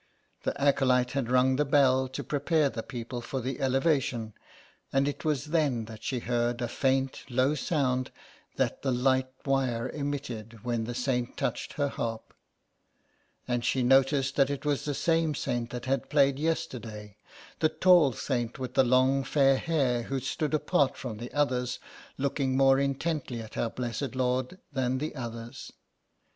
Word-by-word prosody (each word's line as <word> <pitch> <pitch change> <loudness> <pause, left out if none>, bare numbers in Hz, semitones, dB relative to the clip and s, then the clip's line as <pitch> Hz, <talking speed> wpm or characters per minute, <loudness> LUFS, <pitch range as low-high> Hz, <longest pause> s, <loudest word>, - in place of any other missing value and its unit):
The - - -3
acolyte 130 -3 +3
had 135 -4 -2
rung 130 +1 +3
the 150 - +3
bell 135 -2 +3
to 130 - -6
prepare 150 0 +1
the 115 - -4
people 120 0 -6
for 130 +3 -4
the 130 +3 -4
Elevation, 135 -4 +1 0.6
and 135 +1 +2
it 145 - -4
was 150 -2 0
then 140 -9 +1
that 110 -1 -10
she 130 - -1
heard 120 0 0
a 120 - -1
faint 135 +2 0
low 130 +3 +2
sound 130 -4 0 0.5
that - - -1
the 135 - -1
light 130 +1 +2 0.2
wire 130 -3 0
emitted 125 -7 -5
when 120 -2 -1
the 120 +1 -5
saint 125 -1 -1
touched - - -2
her 145 -1 0
harp, 115 -4 -4 1.1
and 120 -1 -1
she 125 +1 +1
noticed 135 +1 +3
that 135 -1 +4
it 140 +1 -4
was 145 -2 0
the 145 -1 -1
same 165 -1 +1
saint 120 -4 -2
that 120 0 -6
had 135 +1 -1
played 140 -2 +3
yesterday, 120 -10 -3 0.4
the 155 - +3
tall 175 -5 +5
saint 120 -2 -2
with 130 -1 -5
the - - +5
long 130 +2 +3
fair 135 -1 +3
hair 135 -8 +1
who 135 +3 -3
stood 150 +4 -1
apart 150 -2 +1
from 120 -5 -5
the 120 +1 -7
others, 125 -4 0 0.4
looking 135 -1 0
more 135 0 +5
intently 140 -2 -1
at 110 -1 -9
Our 115 - 0
Blessed 125 +2 -4
Lord 130 +5 0 0.2
than 130 -1 0
the 150 +4 -3
others. 115 -3 -7
130 Hz, 165 wpm, -29 LUFS, 120-140 Hz, 1.1 s, tall